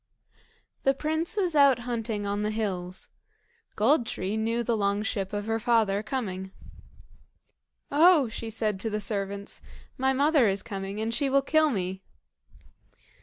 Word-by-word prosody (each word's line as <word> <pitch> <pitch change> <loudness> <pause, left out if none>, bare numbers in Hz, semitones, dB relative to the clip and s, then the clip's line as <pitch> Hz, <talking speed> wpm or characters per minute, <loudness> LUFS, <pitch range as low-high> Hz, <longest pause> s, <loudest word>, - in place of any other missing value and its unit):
The 270 0 +2
prince 315 +7 -2
was 360 -5 0
out 280 -3 +6
hunting 225 -4 -3
on 200 +1 -1
the 210 - 0
hills. 190 -4 -3 0.7
Gold 240 +3 +3
tree 190 +3 -3
knew 230 +2 0
the 235 0 0
long 200 0 0
ship 195 -3 -2
of 205 0 -3
her 225 0 -1
father 220 -3 +2
coming. 205 -5 -4 1.4
"Oh!" 310 -1 +6
she 225 0 -6
said 215 -3 -1
to 225 - -2
the 210 0 -2
servants, 200 -1 -4 0.4
"my 265 +1 +2
mother 280 -1 +3
is 195 0 0
coming, 195 0 -5
and 225 +1 -2
she 280 +2 0
will 275 0 +3
kill 310 +2 +3
me." 190 -5 -3
220 Hz, 150 wpm, -27 LUFS, 200-265 Hz, 1.4 s, out